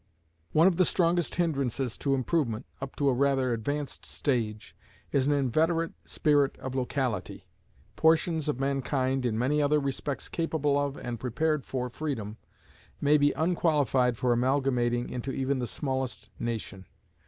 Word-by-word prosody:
One 160 +2 +5
of 185 -3 +4
the 185 - +5
strongest 175 -2 +1
hindrances 135 -7 0
to 140 -1 +1
improvement, 130 -4 0 0.2
up 135 -1 -6
to 140 - 0
a 135 - +4
rather 135 -1 +2
advanced 145 +6 -3
stage, 110 -6 -2 0.4
is 140 -1 +2
an 145 - +3
inveterate 160 +5 +1
spirit 145 -3 +2
of 130 - -6
locality. 125 -5 -2 0.5
Portions 160 -1 +2
of 145 - -1
mankind, 135 -1 0
in 110 -2 -1
many 140 +6 +2
other 150 +1 +3
respects 140 0 -3
capable 160 -4 0
of, 145 -1 0
and 120 -2 -5
prepared 140 +5 0
for 125 -1 -2
freedom, 120 -6 -4 0.6
may 145 +1 +4
be 145 0 +4
unqualified 150 -7 +2
for 125 +1 +2
amalgamating 125 -1 +1
into 125 +2 -4
even 135 0 -1
the 125 - -2
smallest 130 +5 -3
nation. 110 -5 -4
135 Hz, 145 wpm, -28 LUFS, 125-150 Hz, 0.6 s, One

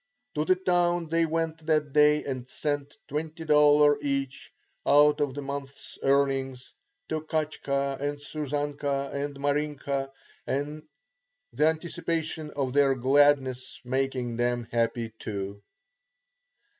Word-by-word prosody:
To 150 - 0
the 185 - +4
town 175 -2 +1
they 165 0 +2
went 160 0 -2
that 150 -3 +1
day 150 0 +5
and 130 -3 -5
sent 145 +1 -3
$20 150 -2 +3
each, 140 -2 -3 0.3
out 150 +1 +5
of 140 -3 0
the 145 - -4
month's 140 0 -7
earnings, 135 -2 0 0.4
to 155 - -1
Katshka 140 -3 -2
and 145 +1 -2
Susanka 145 -1 -3
and 140 0 -3
Marinka, 140 -1 -1 0.4
the - - -4
anticipation 160 -1 -2
of 135 -3 -1
their 140 -1 +4
gladness 130 -1 +2
making 130 -2 -1
them 120 -1 0
happy 115 -1 -1
too. 100 -1 -5
145 Hz, 110 wpm, -27 LUFS, 135-155 Hz, 0.4 s, day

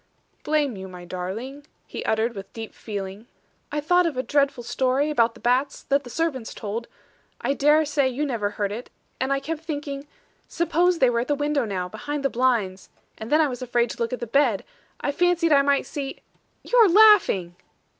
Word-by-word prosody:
"Blame 295 -5 0
you, 190 0 -7
my 180 -1 -10
darling," 220 +11 -6 0.2
he - - -6
uttered 220 +2 +1
with 195 -2 -9
deep 225 -1 -7
feeling. 200 +1 -6 0.4
"I 295 - -1
thought 355 +4 +3
of 300 -6 -4
a 255 - 0
dreadful 280 -4 +1
story 260 +4 0
about 230 -5 +2
the - - -14
bats, 255 +3 0
that 280 +1 +1
the 245 - -10
servants 265 -5 -2
told 220 +3 -5 0.5
I 275 - 0
dare 300 +2 +4
say 285 -2 +1
you 270 +4 -2
never 230 -7 -1
heard 205 -1 -3
it; 230 +4 -6 0.3
and 265 +1 -1
I 275 - +2
kept 315 +3 -5
thinking. 290 -3 -5 0.4
'Suppose 340 +1 +1
they 260 -5 +4
were 235 - +1
at 245 - -2
the 290 - +1
windows 290 -5 0
now, 185 -2 -2
behind 275 +9 -5
the 275 - +2
blinds.' 230 -7 0 0.3
And 220 - -7
then 305 +2 +5
I 310 - +3
was 250 -2 -6
afraid 240 -1 0
to - - -9
look 230 -1 -1
at 250 - -3
the - - -3
bed; 235 -3 +2 0.4
I 285 - 0
fancied 345 +1 +2
I 280 - +6
might 280 0 +2
see 275 -2 -5 0.5
you - - -2
are 450 -4 +7
laughing!" 360 - +5
265 Hz, 205 wpm, -24 LUFS, 225-295 Hz, 0.5 s, are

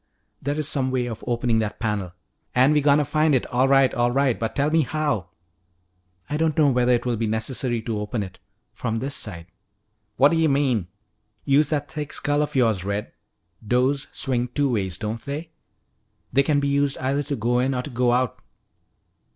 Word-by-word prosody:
"There 145 +2 -2
is 155 -2 -1
some 135 -4 0
way 130 -1 0
of 115 -3 -6
opening 120 -1 +1
that 110 -1 -2
panel 105 -6 -2 0.2
" - - -41
"An' 130 +4 +5
we 150 - +3
gotta 145 +1 +4
find 155 0 +2
it. 125 - +1
All 130 +2 +3
right, 135 -1 +4
all 120 0 +2
right. 130 -1 +1
But 115 - -3
tell 145 +2 +1
me 160 0 +4
how." 145 - -1 1.0
"I 150 - -2
don't 160 0 0
know 150 -3 +5
whether 125 0 +2
it 120 - 0
will 120 -2 0
be 115 +1 -1
necessary 115 +2 -1
to 110 -2 -3
open 105 +1 -3
it 95 -1 -10 0.3
from 115 -2 -3
this 135 +4 -3
side." 85 -10 -3 0.7
"What 140 +2 +6
d'ya 165 -1 +3
mean?" 130 -9 +1 0.6
"Use 145 +2 +3
that 145 -2 -2
thick 150 -2 -5
skull 145 0 0
of 150 - -3
yours, 110 -8 +2
Red. 100 +1 -3 0.6
Doors 130 +4 +1
swing 125 -2 -1
two 140 +2 0
ways, 95 -5 -1
don't 110 +2 -4
they? 150 +4 -6 0.8
They 140 - +5
can 145 0 +2
be 140 - 0
used 140 0 +1
either 135 +2 0
to 145 0 -3
go 120 +1 +1
in 130 +1 +1
or 125 - -2
to 145 - -7
go 125 0 +2
out." 125 -1 0
130 Hz, 200 wpm, -23 LUFS, 115-145 Hz, 1.0 s, What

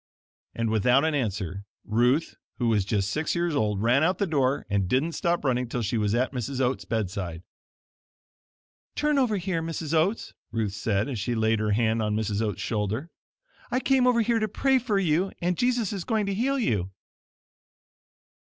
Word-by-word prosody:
And 115 -1 -1
without 125 +7 +3
an 160 - +1
answer, 100 - -2 0.2
Ruth, 125 +8 +1 0.2
who 120 -2 +1
was 105 -4 +2
just 100 -1 0
six 155 +3 -1
years 170 -2 0
old 105 -5 0
ran 125 +5 +4
out 180 +3 +2
the 200 - +1
door 140 -5 0
and 100 -3 0
didn't 135 - +1
stop 170 -1 -1
running 125 -2 0
till 120 0 -2
she 110 +3 -1
was 105 +1 +1
at 125 +2 +1
Mrs. 130 +1 -3
Oat's 130 0 0
bedside. 95 -6 -3 1.5
"Turn 300 -1 +2
over 235 -6 +2
here, 180 -2 -2
Mrs. 165 -1 -4
Oats," 175 +8 +1 0.2
Ruth 110 -4 -1
said, 105 -1 0
as 130 -6 -4
she 120 +4 -1
laid 110 0 +2
her 105 -1 +1
hand 110 +1 +1
on 105 -1 0
Mrs. 105 -1 -1
Oats' 105 -4 -2
shoulder. 110 - -2 0.6
"I 255 - +1
came 260 -1 +3
over 240 -2 +4
here 230 +1 +2
to 215 - 0
pray 265 +5 +2
for 225 -5 0
you 180 0 +1
and 175 +1 0
Jesus 245 -1 +1
is 195 -3 -4
going 220 0 0
to 200 - -1
heal 265 +7 0
you." 105 - 0
130 Hz, 185 wpm, -26 LUFS, 110-180 Hz, 1.5 s, ran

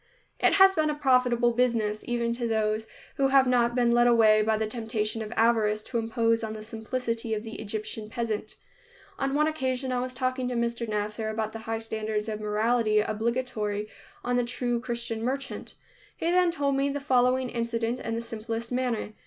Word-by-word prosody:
It - - +4
has 385 0 +7
been 310 -3 +1
a 300 - -1
profitable 250 -4 +3
business, 230 -3 +1
even 235 -1 0
to 235 0 -2
those 220 0 0 0.3
who 275 - +3
have 270 0 +5
not 240 -1 +2
been 240 -1 +3
led 240 0 +5
away 220 -3 +5
by 220 0 +2
the 220 - 0
temptation 220 -1 -2
of 215 0 -6
avarice 220 -2 +3
to 235 - -2
impose 230 0 +1
on 220 -1 -3
the 215 0 -7
simplicity 230 0 -3
of 210 - -4
the 225 -1 -7
Egyptian 215 0 -5
peasant. 220 -2 -3 0.6
On 275 0 0
one 300 +1 +3
occasion 260 -4 -1
I 250 - 0
was 255 +1 -4
talking 255 0 -1
to 250 - -2
Mr. 235 -1 -1
Nasser 210 +1 -2
about 220 0 -2
the 225 - -6
high 225 - 0
standards 220 -1 -3
of 215 -1 -4
morality 215 +1 +2
obligatory 215 -1 -2 0.3
on 245 0 0
the 245 - +2
true 240 0 -1
Christian 235 -2 -4
merchant. 270 +3 -4 0.4
He 335 - 0
then 360 0 +4
told 285 -5 0
me 275 +1 +1
the 285 +1 -2
following 255 -2 +2
incident 235 0 -2
in 225 - -3
the 230 - -2
simplest 230 0 -5
manner. 245 -4 -1
235 Hz, 190 wpm, -27 LUFS, 220-250 Hz, 0.6 s, has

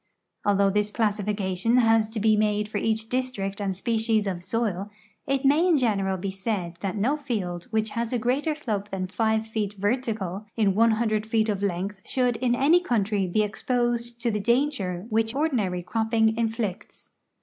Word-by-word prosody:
Although 200 -1 +4
this 210 +1 +1
classification 210 0 0
has 225 -2 +4
to 220 0 -4
be 215 +1 +4
made 210 0 +1
for 210 -1 -3
each 220 0 0
district 225 -6 -2
and 195 -2 -1
species 225 0 +1
of 185 -3 -3
soil, 200 0 -2 0.4
it 275 0 0
may 300 +6 +4
in 340 -4 +4
general 195 -7 +1
be 190 +2 -3
said 190 -4 -3
that 195 +1 -2
no 245 +9 +2
field 205 - -3
which 220 -1 0
has 230 +1 -2
a 250 - +1
greater 260 +7 0
sloi)e 215 -9 -3
than 190 -2 -3
five 220 +3 0
feet 215 -2 -3
vertical 210 -2 -2
in 205 -3 +3
one 230 +4 +4
hundred 215 -2 0
feet 220 0 +1
of 200 -2 -1
length 195 +1 -2
should 250 -3 0
in 245 0 +1
any 305 +8 +4
countiy 205 - 0
be 215 - +3
exj)Osed 240 +2 -1
to 235 0 -1
the 210 - -1
danger 215 -6 0
which 225 +2 +1
ordinary 220 - 0
cropping 220 +2 +1
inflicts. 225 -4 -3
220 Hz, 175 wpm, -26 LUFS, 200-235 Hz, 0.4 s, Although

